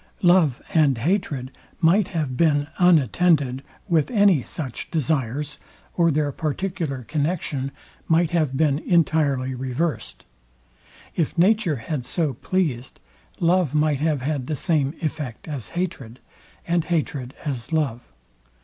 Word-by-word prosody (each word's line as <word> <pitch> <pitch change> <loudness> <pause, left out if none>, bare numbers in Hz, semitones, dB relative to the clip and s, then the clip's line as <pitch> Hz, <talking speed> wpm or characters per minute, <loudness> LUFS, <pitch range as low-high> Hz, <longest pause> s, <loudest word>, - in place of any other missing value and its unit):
Love 175 -8 +4
and 150 -6 +4
hatred 140 - -1 0.3
might 180 +4 +4
have 155 -9 -2
been 145 -1 +3
unattended 155 - +3 0.3
with 165 -5 +2
any 200 - +4
such 130 0 -5
desires, 145 -1 -1 0.4
or 170 -1 +4
their 150 -1 +1
particular 155 -3 -3
connexion 145 -1 -2 0.4
might 165 0 +3
have 155 -6 +1
been 145 -2 +2
entirely 150 -7 +1
reversed. 130 +6 -3 0.9
If 165 +1 -1
nature 190 -2 +3
had 130 +2 -4
so 150 +2 -1
pleased, 135 -4 -2 0.4
love 170 -4 +2
might 150 -2 +2
have 150 -3 0
had 140 -3 -2
the 155 - -1
same 145 -1 0
effect 150 -6 -4
as 140 -9 -5
hatred, 135 -10 -4 0.5
and 170 -1 +1
hatred 145 -6 -2
as 130 -4 -4
love. 135 -7 -1
150 Hz, 120 wpm, -23 LUFS, 135-170 Hz, 0.9 s, Love